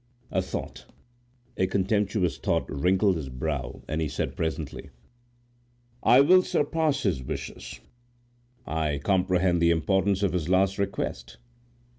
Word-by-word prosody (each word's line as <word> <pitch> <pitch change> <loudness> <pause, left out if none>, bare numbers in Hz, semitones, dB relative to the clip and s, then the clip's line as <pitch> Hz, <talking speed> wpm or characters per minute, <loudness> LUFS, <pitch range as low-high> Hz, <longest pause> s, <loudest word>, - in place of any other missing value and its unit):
A 95 - +1
thought, 95 - -6 0.7
a 95 - +2
contemptuous 100 -1 0
thought, - - 0
wrinkled 95 +5 +2
his 70 -4 -6
brow, 65 0 -4
and 80 +1 -2
he 80 - 0
said - - -3
presently,— 80 -3 -4 1.1
"I 125 - +6
will 185 +6 +6
surpass 150 -3 0
his 90 -11 0
wishes. 65 - -7 0.8
I 80 -2 -1
comprehend 90 +2 +1
the 85 - +4
importance 95 +4 +1
of 95 - +1
his 90 -2 -2
last 95 +1 +2
request. 65 -10 -3
90 Hz, 125 wpm, -26 LUFS, 80-100 Hz, 1.1 s, I